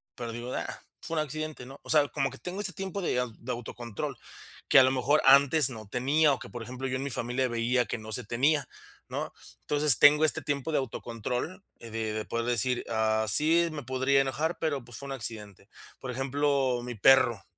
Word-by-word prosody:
pero 120 Hz, -1 st, -5 dB
digo: 120 Hz, +2 st, -6 dB
"Ah, -, -, -5 dB, 0.2 s
fue 165 Hz, -, -5 dB
un 155 Hz, -, +2 dB
accidente", 155 Hz, -2 st, -6 dB
¿no?, 135 Hz, +2 st, -12 dB
o -, -, -14 dB
sea, 150 Hz, -2 st, +5 dB
como 135 Hz, -2 st, -1 dB
que 135 Hz, -, -10 dB
tengo 180 Hz, +2 st, -6 dB
ese 190 Hz, -3 st, -1 dB
tiempo 195 Hz, +3 st, -5 dB
de 145 Hz, -8 st, 0 dB
au 125 Hz, -2 st, -2 dB
de 125 Hz, -, -6 dB
autocontrol, 120 Hz, -2 st, -6 dB, 0.5 s
que -, -, +8 dB
a -, -, +8 dB
lo 130 Hz, -, +3 dB
mejor 135 Hz, +3 st, +2 dB
antes 140 Hz, +1 st, +6 dB
no 110 Hz, -5 st, -9 dB
tenía, 140 Hz, +7 st, +2 dB
o 135 Hz, -, -4 dB
que, -, -, -10 dB
por 120 Hz, -2 st, -7 dB
ejemplo, 125 Hz, +3 st, -5 dB
yo 130 Hz, -, -2 dB
en 130 Hz, -, -4 dB
mi 140 Hz, -, -3 dB
familia 125 Hz, +1 st, -1 dB
veía 120 Hz, +1 st, +1 dB
que -, -, -4 dB
no 110 Hz, 0 st, -9 dB
se 125 Hz, -, 0 dB
tenía, 135 Hz, +6 st, +1 dB, 0.4 s
¿no?, -, -, -4 dB, 0.3 s
entonces, 145 Hz, -4 st, +4 dB
tengo 150 Hz, +1 st, +7 dB
este 155 Hz, -, +2 dB
tiempo 145 Hz, +1 st, -2 dB
de 155 Hz, -, +1 dB
autocontrol 125 Hz, -, -4 dB, 0.2 s
de 115 Hz, -, -11 dB, 0.2 s
de 110 Hz, 0 st, -3 dB
poder 115 Hz, 0 st, -3 dB
decir: 120 Hz, +1 st, 0 dB
"Ah, 110 Hz, -1 st, +1 dB
sí, 165 Hz, +8 st, +3 dB
me 150 Hz, -2 st, -6 dB
podría 130 Hz, +2 st, +2 dB
enojar, 150 Hz, +5 st, -2 dB
pero, 145 Hz, -5 st, -2 dB
pues, 120 Hz, -1 st, -9 dB
fue 140 Hz, -, -8 dB
un -, -, -6 dB
accidente". 105 Hz, -6 st, -6 dB, 0.3 s
Por 130 Hz, -, -6 dB
ejemplo, 135 Hz, -1 st, 0 dB
mi 120 Hz, 0 st, -6 dB
perro, 120 Hz, -2 st, +4 dB
130 Hz, 215 wpm, -28 LUFS, 120-145 Hz, 0.5 s, que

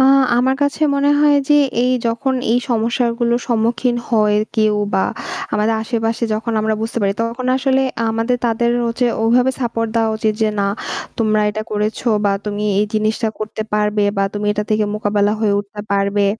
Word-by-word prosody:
আ -, -, +6 dB, 0.3 s
আমার 260 Hz, +2 st, +2 dB
কাছে 285 Hz, +2 st, -1 dB
মনে 280 Hz, +1 st, +2 dB
হয় 295 Hz, -1 st, +5 dB
যে, 295 Hz, -, +5 dB, 0.3 s
এই 250 Hz, +1 st, +2 dB
যখন 235 Hz, +3 st, 0 dB, 0.2 s
এই 245 Hz, -, +3 dB
সমস্যাগুলোর 235 Hz, +1 st, 0 dB
সম্মুখীন 235 Hz, +1 st, +1 dB
হয় 210 Hz, -2 st, +3 dB, 0.2 s
কেউ 215 Hz, -1 st, +3 dB, 0.2 s
বা 190 Hz, -, +2 dB, 0.5 s
আমাদের 215 Hz, +2 st, +1 dB
আশেপাশে 225 Hz, 0 st, -1 dB
যখন 225 Hz, +2 st, -3 dB
আমরা 220 Hz, 0 st, 0 dB
বুঝতে 225 Hz, +1 st, -3 dB
পারি 195 Hz, 0 st, +2 dB
তখন 235 Hz, +2 st, -3 dB
আসলে 265 Hz, 0 st, +1 dB, 0.3 s
আমাদের 225 Hz, +2 st, 0 dB
তাদের 235 Hz, +1 st, +1 dB, 0.2 s
হচ্ছে 235 Hz, +2 st, 0 dB, 0.2 s
ওইভাবে 245 Hz, +3 st, +3 dB
support 230 Hz, -2 st, -1 dB
দেওয়া 225 Hz, -1 st, +2 dB
উচিত 215 Hz, -1 st, 0 dB
যে, 220 Hz, -, +3 dB
"না 200 Hz, -, +1 dB, 0.5 s
তোমরা 215 Hz, -2 st, +2 dB
এটা 215 Hz, +1 st, -4 dB
করেছো" 215 Hz, +3 st, -1 dB, 0.2 s
বা 200 Hz, -, +3 dB
"তুমি 210 Hz, 0 st, -3 dB, 0.2 s
এই 210 Hz, -, +1 dB
জিনিসটা 215 Hz, +1 st, 0 dB
করতে 215 Hz, 0 st, -4 dB
পারবে" 210 Hz, 0 st, +1 dB
বা 195 Hz, -, +2 dB
"তুমি 205 Hz, 0 st, -2 dB
এটা 210 Hz, 0 st, -2 dB
থেকে 215 Hz, 0 st, +2 dB
মোকাবেলা 205 Hz, -1 st, +1 dB
হয়ে 210 Hz, -2 st, +2 dB
উঠতে 205 Hz, +1 st, -6 dB
পারবে।" 200 Hz, 0 st, +1 dB
225 Hz, 175 wpm, -18 LUFS, 210-240 Hz, 0.5 s, আ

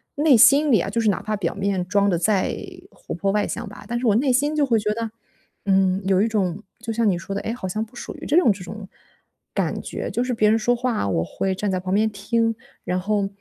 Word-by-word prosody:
内 295 Hz, -2 st, +5 dB
心 280 Hz, +5 st, +6 dB
里 215 Hz, -, +5 dB
啊， 195 Hz, -, -2 dB
就 230 Hz, +3 st, -1 dB
是 225 Hz, -, +1 dB
哪 185 Hz, -, -3 dB
怕 215 Hz, 0 st, -2 dB
表 175 Hz, -4 st, -2 dB
面 195 Hz, -2 st, -1 dB
装 200 Hz, +1 st, +2 dB
得 175 Hz, -, +1 dB
再 195 Hz, +1 st, +1 dB, 0.3 s
活 -, -, -9 dB
泼 195 Hz, +3 st, 0 dB
外 210 Hz, 0 st, +1 dB
向 235 Hz, -3 st, -5 dB
吧， -, -, -12 dB
但 240 Hz, 0 st, -2 dB
是 245 Hz, -, -1 dB
我 210 Hz, -, +4 dB
内 255 Hz, +1 st, +2 dB
心 290 Hz, +4 st, +1 dB
就 295 Hz, -2 st, +3 dB
会 230 Hz, -4 st, +2 dB
觉 210 Hz, 0 st, -1 dB
得， 230 Hz, -1 st, -3 dB, 0.5 s
嗯， 190 Hz, 0 st, +2 dB
有 190 Hz, -1 st, +3 dB
一 220 Hz, -, +3 dB
种 205 Hz, -2 st, -1 dB, 0.2 s
就 225 Hz, 0 st, -5 dB
像 225 Hz, -1 st, +1 dB
你 185 Hz, -, +3 dB
说 190 Hz, +3 st, -5 dB
的， -, -, -2 dB
哎， 225 Hz, -, -3 dB
好 190 Hz, -6 st, -5 dB
像 215 Hz, +4 st, -2 dB
不 230 Hz, -, -21 dB
属 -, -, -7 dB
于 -, -, -9 dB
这 300 Hz, -, +1 dB
种 290 Hz, -, +5 dB
这 190 Hz, -2 st, -5 dB
种 200 Hz, +2 st, -8 dB, 0.7 s
感 -, -, -1 dB
觉。 -, -, -5 dB
就 240 Hz, +5 st, 0 dB
是 250 Hz, -1 st, -2 dB
别 215 Hz, -2 st, +3 dB
人 220 Hz, -, +4 dB
说 240 Hz, +3 st, +1 dB
话， 240 Hz, -, -1 dB
我 80 Hz, -4 st, 0 dB
会 190 Hz, -, -2 dB
站 205 Hz, +1 st, -2 dB
在 185 Hz, -, 0 dB
旁 185 Hz, +1 st, -3 dB
边 220 Hz, +2 st, +3 dB
听， 225 Hz, +3 st, 0 dB, 0.3 s
然 180 Hz, 0 st, -1 dB
后， 200 Hz, +1 st, 0 dB
210 Hz, 280 characters per minute, -23 LUFS, 195-235 Hz, 0.7 s, 心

